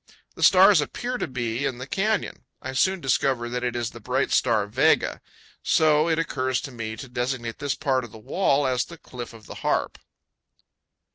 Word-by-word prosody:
The - - -11
stars - - +7
appear 250 0 -4
to - - -2
be 120 -1 -3
in 130 -3 -1
the 130 - -6
canyon. 210 +9 -1
I 130 - -6
soon 185 +7 +1
discover 130 -3 +1
that 125 +1 -3
it 120 -1 -1
is 120 -1 -2
the 115 - -11
bright 125 +4 -1
star 115 -5 +2
Vega; 105 - +2 0.4
so 155 0 +3
it 160 - +2
occurs 130 -5 -1
to 135 - -7
me 115 -2 -5
to 120 - -9
designate 120 -1 -3
this 145 -1 -1
part 135 -4 0
of 120 - -10
the - - -11
wall 140 - +1
as 130 -1 +1
the 170 - -11
"Cliff 125 -5 -9
of 115 -2 -14
the - - -9
Harp." - - -1
130 Hz, 195 wpm, -25 LUFS, 120-145 Hz, 0.4 s, stars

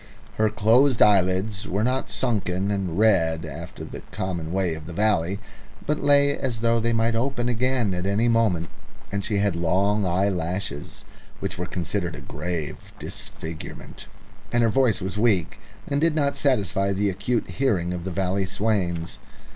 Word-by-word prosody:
Her 110 0 +3
closed 115 +5 +4
eyelids 100 +1 +3
were 100 +3 0
not 130 +2 0
sunken 100 -5 0
and 95 -4 -2
red 85 -7 +3
after - - -7
the - - -8
common 85 -4 -3
way 95 -2 0
of 80 0 -8
the 85 - -7
valley, 100 -2 +1 0.5
but 150 0 0
lay 140 0 +4
as 120 -4 -3
though 115 0 +3
they 115 +1 +1
might 115 0 +2
open 120 +1 0
again 125 -3 +1
at 90 +1 -2
any 105 +4 +2
moment; 110 -8 +2 0.4
and 100 0 -2
she 105 0 0
had 100 -3 +1
long 95 +5 +2
eyelashes, 90 -3 -2 0.3
which 100 -1 -4
were 90 - -2
considered 90 0 -2
a - - -9
grave 85 -4 -5
disfigurement. 80 0 -8 0.4
And 120 0 +3
her 115 - +4
voice 115 -2 +2
was 95 +1 -2
strong, 105 -5 +3 0.4
and 140 +1 -1
did 165 -1 +3
not 140 -2 +1
satisfy 100 -8 +1
the 100 +1 +1
acute 105 +5 -1
hearing 95 -10 0
of 90 -1 -4
the 95 - -3
valley 95 +2 0
swains. 95 -5 -1
100 Hz, 165 wpm, -24 LUFS, 90-115 Hz, 0.5 s, closed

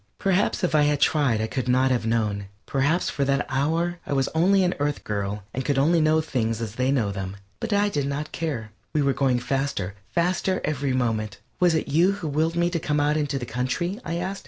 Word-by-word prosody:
Perhaps 195 +1 +1
if 180 - +1
I 155 - +5
had 145 -1 +2
tried 140 -8 +2
I - - +1
could 130 +2 -3
not 130 +1 +3
have 120 -3 0
known; 105 -3 0 0.2
perhaps 145 +6 +1
for 140 - -1
that 140 +1 +1
hour 165 +6 0
I - - -1
was 135 -1 +2
only 190 +4 +3
an 180 - +2
Earth 145 0 -1
girl 100 0 -3
and 130 - -2
could 140 +1 0
only 160 +5 +4
know 155 +1 +3
things 115 -7 -1
as 110 -3 -4
they 130 +3 0
know 115 -7 +1
them, 95 0 -5 0.2
but 230 - -4
I 205 0 +3
did 145 -8 -1
not 145 +2 -3
care. 130 -10 -3 0.2
We 150 - +2
were 140 -1 +2
going 130 -3 +2
faster, 135 -8 -2 0.2
faster 185 +2 0
every 140 -3 -1
moment. 110 -5 -1 0.2
"Was 175 -2 +4
it 160 - -1
you 170 +7 +3
who 180 -5 -5
willed 160 +3 0
me 170 0 +1
to 170 - 0
come 150 -2 0
out 145 +1 +2
into 145 -2 0
the 125 - -4
country?" 130 - -2
I 165 - -3
asked. 190 +3 -3
140 Hz, 230 wpm, -25 LUFS, 125-165 Hz, 0.2 s, I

